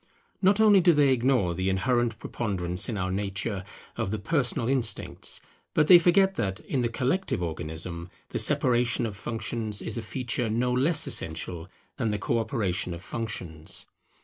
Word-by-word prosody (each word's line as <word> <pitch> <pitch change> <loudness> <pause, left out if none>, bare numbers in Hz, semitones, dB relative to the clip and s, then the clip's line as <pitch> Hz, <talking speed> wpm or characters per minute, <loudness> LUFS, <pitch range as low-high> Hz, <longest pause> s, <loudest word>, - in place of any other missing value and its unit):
Not 200 +2 +4
only 210 -3 +6
do 175 -1 +5
they 145 -3 +4
ignore 120 -8 +2
the 95 +2 -1
inherent 115 +4 +1
preponderance 95 -6 -2
in 110 - -2
our 95 -1 -2
nature 100 +1 -2 0.3
of - - -2
the 110 - -2
personal 120 +1 0
instincts; 130 -4 0 0.3
but 150 - +4
they 175 +3 +9
forget 190 +3 +4
that, 95 0 -1
in 135 - -2
the 120 - 0
collective 130 - -1
Organism, 85 +1 -5 0.2
the - - -3
separation 120 -1 +2
of 105 -3 -4
functions 110 -1 -3
is 110 +1 -3
a - - -4
feature 120 0 -2
no 125 +3 0
less 140 +7 +3
essential 85 0 -1 0.3
than 120 -5 0
the 105 - -1
co 115 +4 0
operation 100 -7 -2
of 85 - -11
functions. 95 -7 -4
115 Hz, 165 wpm, -27 LUFS, 95-130 Hz, 0.3 s, they